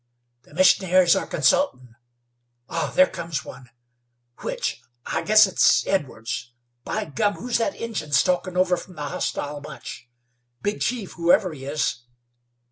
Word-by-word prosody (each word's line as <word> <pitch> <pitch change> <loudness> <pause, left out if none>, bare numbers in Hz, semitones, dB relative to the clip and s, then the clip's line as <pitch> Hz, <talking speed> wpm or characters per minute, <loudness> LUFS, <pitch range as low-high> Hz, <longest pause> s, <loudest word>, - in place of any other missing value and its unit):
"The - - -18
missionaries 185 -1 +5
are - - -2
consultin'. 125 - +1 0.7
Ah! 165 - -2
there 275 - +7
comes 165 - -5
one! 125 -1 -11 0.7
Which? - - -3 0.2
I - - -2
guess 215 0 +6
it's 190 - +3
Edwards. 120 -9 -3 0.3
By - - -3
gum! 205 +7 0
who's 245 -1 -1
that 290 +6 -1
Injun 225 -10 -5
stalkin' 180 +5 +1
over 180 -1 +3
from 185 - -11
the 150 - -6
hostile 145 +1 -3
bunch. 125 -4 -9 0.5
Big 205 +1 -2
chief, 235 -6 -2
whoever 175 +1 +2
he 135 -3 -9
is. 145 -2 -1
175 Hz, 135 wpm, -23 LUFS, 145-200 Hz, 0.7 s, there